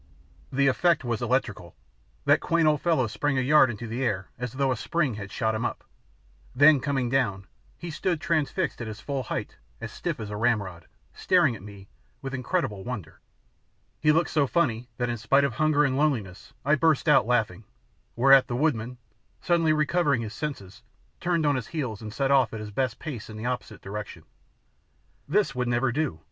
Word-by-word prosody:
The 140 +1 +2
effect 155 +4 +3
was 120 -2 -2
electrical. 115 -8 -2 0.5
That - - +5
quaint 165 -1 +2
old 150 -2 +2
fellow 165 -7 +2
sprang 135 +5 -1
a - - +2
yard 145 0 +5
into 115 +1 -6
air 115 -6 -2
as 125 -1 -5
though 135 0 +1
a - - +1
spring 145 +2 -1
had 100 -2 -7
shot 110 +1 0
him 110 +2 -2
up. - - -3 0.7
Then, 145 +2 +6
coming 135 -2 -1
down, 115 -7 0 0.3
he 170 - -7
stood 175 +1 -1
transfixed 160 -1 -1
at 115 - -4
his 110 0 -7
full 140 +3 -3
height 120 - -5 0.2
as - - -6
stiff - - -4
as 105 -2 -6
a - - -4
ramrod, 100 -8 -1 0.3
staring 170 -9 +2
at 105 - -11
me 100 -1 -12 0.3
with 135 0 -6
incredible 130 - -2
wonder. 100 -10 -7 0.8
He 150 - +4
looked 160 -1 +1
so 145 -3 +2
funny 125 -6 0
that 125 - -1
in 120 0 -2
spite 135 +6 +3
of 140 -4 0
hunger 155 +2 +2
and 130 -2 0
loneliness 120 -11 -1
I 150 - +3
burst 155 +1 +2
out 150 -6 +5
laughing, 110 -5 0 0.5
whereat 135 +2 +6
the 120 - -3
woodman, 125 -4 -1 0.4
suddenly 170 -3 +2
recovering 150 -4 +1
his 110 -1 -6
senses, 120 -10 -6 0.4
turned 170 -3 0
on 145 -1 +3
his 125 -4 -3
heels 130 -11 -4
and 110 -1 -7
set 135 +4 0
off 135 -4 +3
at - - -5
his 105 -1 -7
best 125 +2 -1
pace 130 -10 -7
in 110 - -8
the 110 - -6
opposite 125 -4 -4
direction. 100 -4 -7 1.0
This 190 +2 +1
would 125 -1 -2
never 120 +1 +1
do! 140 - -2
130 Hz, 190 wpm, -26 LUFS, 110-150 Hz, 1.0 s, Then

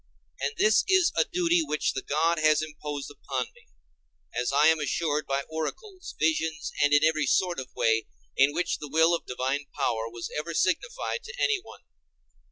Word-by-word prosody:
And 140 +1 -2
this 215 0 +4
is 375 -3 +4
a - - +3
duty 350 -2 +2
which 155 - -1
the 135 - -3
God 160 +3 +1
has 155 0 +3
imposed 150 -2 -6
upon 145 - -3
me, - - -22 0.7
as 125 +2 -1
I 140 +2 +4
am 160 0 +5
assured 150 +1 -1
by 135 0 -1
oracles, 355 - -6
visions, 160 0 0
and 145 - +4
in 145 +1 +5
every 155 -2 +2
sort 180 +1 +1
of 130 - -7
way 115 0 +2 0.3
in 140 +2 +4
which 170 +3 -1
the 150 - -7
will 160 +3 +4
of 170 - -2
divine 135 +3 -2
power 115 -5 -1
was 115 0 -7
ever 155 +2 -3
signified 475 - -1
to 470 +1 -8
anyone. 405 -4 -1
155 Hz, 175 wpm, -27 LUFS, 145-180 Hz, 0.7 s, am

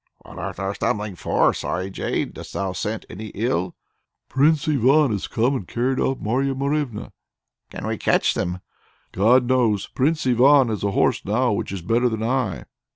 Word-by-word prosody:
"What - - -11
art - - -4
thou 95 0 -3
stumbling 105 0 -2
for, - - +2
sorry 95 +2 -3
jade? - - -2
dost - - -10
thou 95 -1 -2
scent 105 +4 -4
any 110 +4 -8
ill?" 95 -5 -1 0.5
"Prince 145 +3 +2
Ivan 140 0 +4
has 100 -3 -2
come 125 +5 +1
and 100 -9 -5
carried 130 +2 -1
off 135 - 0
Marya 135 +5 -1
Morevna." 140 -4 -2 0.6
"Can - - -7
we - - -3
catch - - +2
them?" 90 +1 -3 0.5
"God 120 +6 +4
knows! 120 -6 +2
Prince 150 +4 0
Ivan 130 +1 +5
has 105 -3 -3
a 100 - +1
horse - - +1
now 115 +5 +1
which 100 - -2
is 95 -3 -5
better 120 +6 +2
than 110 -1 -3
I." 120 -4 -1
120 Hz, 175 wpm, -22 LUFS, 100-135 Hz, 0.6 s, Ivan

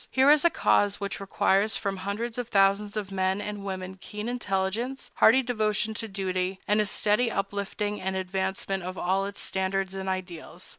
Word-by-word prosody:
Here 265 +2 +5
is 300 -1 +5
a 340 - +6
cause 205 -10 +2
which 200 -1 -4
requires 200 +1 +2
from 195 -1 -2
hundreds 215 +5 -3
of 245 - -3
thousands 200 0 +2
of 200 -2 -4
men 190 0 0
and 205 -1 -5
women 190 -1 -5
keen 210 +1 -6
intelligence, 235 +2 -2
hearty 260 +4 +6
devotion 220 -3 0
to 225 +1 -5
duty, 190 -1 -2
and 210 +1 +3
a 210 - 0
steady 210 +4 +2
uplifting 205 0 -3
and 190 0 -2
advancement 190 +1 -2
of 185 +1 -6
all 195 +2 0
its 200 - -6
standards 190 0 -1
and 190 0 -4
ideals. 185 -3 -6
200 Hz, 180 wpm, -27 LUFS, 190-215 Hz, -, a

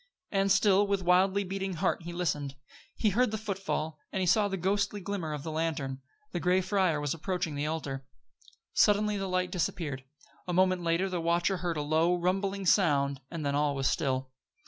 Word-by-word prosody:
And 195 -1 +2
still, 200 0 +4
with 200 -1 0
wildly 190 +3 +3
beating 195 0 -3
heart, 165 - 0
he 170 +1 -7
listened. 150 -6 -2 0.4
He 215 - +1
heard 245 +5 +3
the 220 - -2
footfall, 195 -7 -3
and 190 - -2
he 185 - +1
saw 205 +4 +4
the 195 -1 -3
ghostly 200 +3 0
glimmer 190 -5 -3
of 150 -2 -4
the 160 - -4
lantern; 150 -4 -2 0.3
the 175 - -2
gray 180 +3 +3
friar 185 -4 +1
was 145 -1 -1
approaching 175 -1 -2
the 145 +1 -2
altar. 140 -4 -3 0.7
Suddenly 210 0 +3
the 195 -1 -3
light 185 0 0
disappeared. 160 -6 -2 0.4
A 180 - -2
moment 185 0 +3
later 170 +3 +1
the 180 -3 -2
watcher 170 +3 +1
heard 175 -2 -2
a 150 - -1
low, 160 +4 +2
rumbling 195 +2 -1
sound, 140 -7 +3
and 165 -3 -5
then 140 - 0
all 145 0 +1
was 135 0 0
still. 130 -2 -1
180 Hz, 190 wpm, -30 LUFS, 155-195 Hz, 0.7 s, still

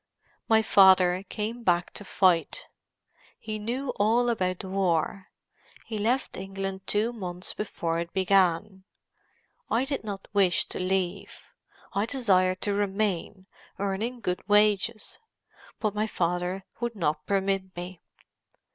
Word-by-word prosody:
"My 220 0 +5
father 185 -3 +6
came 225 +2 -4
back 175 -5 +1
to - - -7
fight. 180 -5 +2 0.7
He 215 -1 -5
knew 250 +5 -3
all 235 +4 +3
about 185 -5 -1
the 190 - -8
war; 185 0 0 0.6
he 220 -2 -4
left 240 +6 0
England 195 0 -5
two 220 +3 +1
months 180 -4 -5
before 170 -5 -3
it 170 0 -4
began. 190 0 +2 0.9
I 245 +3 +1
did 275 -3 -3
not 200 -2 -6
wish 195 -4 +3
to - - -5
leave. 185 +1 -2 0.5
I 200 +3 0
desired 185 -8 +2
to 205 - 0
remain, 200 -2 -1 0.3
earning 210 +5 -2
good 180 -4 -2
wages. 210 +1 +2 0.6
But 215 -2 0
my 210 +1 0
father 180 0 -1 0.2
would 240 -1 -3
not 155 -5 -1
permit 195 -1 0
me." 175 0 -7
195 Hz, 130 wpm, -27 LUFS, 185-215 Hz, 0.9 s, father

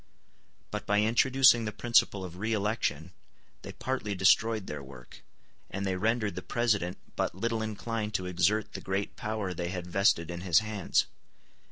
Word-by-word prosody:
But 105 - -5
by 105 0 +3
introducing 120 +1 +5
the 105 - -2
principle 105 -4 +2
of 90 -1 -9
re 110 +4 -1
election 100 -7 -1 0.5
they - - -8
partly 130 -6 -3
destroyed 110 +3 +3
their 75 -4 -6
work; 65 -2 -13 0.5
and 100 0 -4
they 95 -1 0
rendered 110 +2 0
the - - -5
President 105 -7 0 0.2
but - - -1
little 115 +3 -1
inclined 110 0 -3
to 90 - -1
exert 90 +4 +1
the - - -6
great 95 +1 -3
power 105 -3 -3
they 85 0 -3
had 90 -1 -4
vested 90 -2 +2
in 85 0 -6
his 90 -3 +3
hands. 110 -3 +1
105 Hz, 165 wpm, -29 LUFS, 90-110 Hz, 0.5 s, introducing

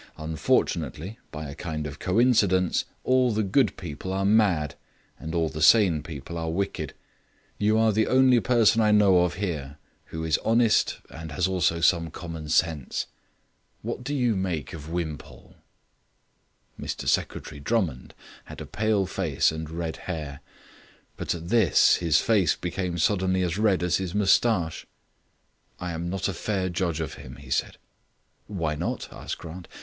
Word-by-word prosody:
Unfortunately, 80 +4 -1
by 75 -1 -6
a 70 - -7
kind 75 -1 -5
of 75 0 -7
coincidence, 95 -4 +2 0.2
all 130 -1 +3
the 110 0 0
good 105 +2 +2
people 85 +1 -6
are 95 +1 -1
mad, 95 -9 +3 0.5
and 80 +2 -5
all 80 -1 +2
the 80 0 -6
sane 90 -3 +5
people 75 +2 -7
are 80 0 -3
wicked. 100 +4 -3 0.6
You 105 +1 +3
are 110 0 +4
the 110 +1 +1
only 130 -1 +5
person 115 -1 +3
I 105 - +3
know 100 -3 +5
of 90 -1 +1
here 75 -7 -4 0.3
who 80 0 -6
is 80 -2 +1
honest 115 -1 +2
and 80 0 -8
has 90 +4 +1
also 85 -3 +1
some 85 0 +3
common 80 -2 -7
sense. 80 -4 0 0.8
What 125 - -4
do 145 +3 -3
you 125 -5 +1
make 90 -6 -3
of 80 -1 -8
Wimpole?" 80 -4 -6 1.3
Mr - - -5
Secretary 75 - -1
Drummond 80 - -2 0.3
had - - -10
a - - -6
pale 110 -2 0
face 90 -6 +1
and 80 -1 -6
red 80 0 -4
hair; 75 -6 -6 0.8
but - - -2
at 85 0 -8
this 110 -5 +5
his 80 -3 +3
face 100 -8 +2
became 90 0 -3
suddenly 95 +1 +1
as 90 +2 -1
red 100 -5 +2
as 90 - +2
his 95 -1 -4
moustache. 100 -4 +2 0.9
"I 90 0 -4
am 85 +1 -4
not 95 +1 -2
a 100 - -2
fair 95 +1 -2
judge 85 -2 -1
of 80 - -4
him," 65 0 -10
he 70 +3 -13
said. - - -1 0.7
"Why 85 -7 -2
not?" 75 - -3
asked - - -6
Grant. 85 +1 -9
90 Hz, 160 wpm, -26 LUFS, 80-105 Hz, 1.3 s, sane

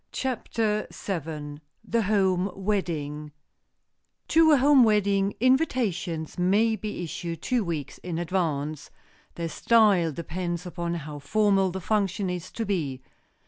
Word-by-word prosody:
CHAPTER 225 -4 -1
VII 155 -5 -5 0.3
THE 230 - +1
HOME 190 -2 +2
WEDDING 155 -7 -2 0.9
TO 325 0 +5
a - - +6
home 275 0 +6
wedding, 200 -2 +2
invitations 205 - 0
may 210 +5 +3
be 215 -4 -5
issued 165 0 -5
two 250 -3 +1
weeks 160 -6 -4
in 175 -2 -5
advance. 155 -4 -2 0.5
Their 170 -1 -3
style 200 -2 +3
depends 170 +2 -4
upon 170 -1 -3
how 150 -3 -6
formal 195 +4 +2
the 190 +1 -5
function 195 -1 0
is 180 -2 -6
to 225 - -3
be. 145 -11 -2
185 Hz, 125 wpm, -26 LUFS, 165-215 Hz, 0.9 s, a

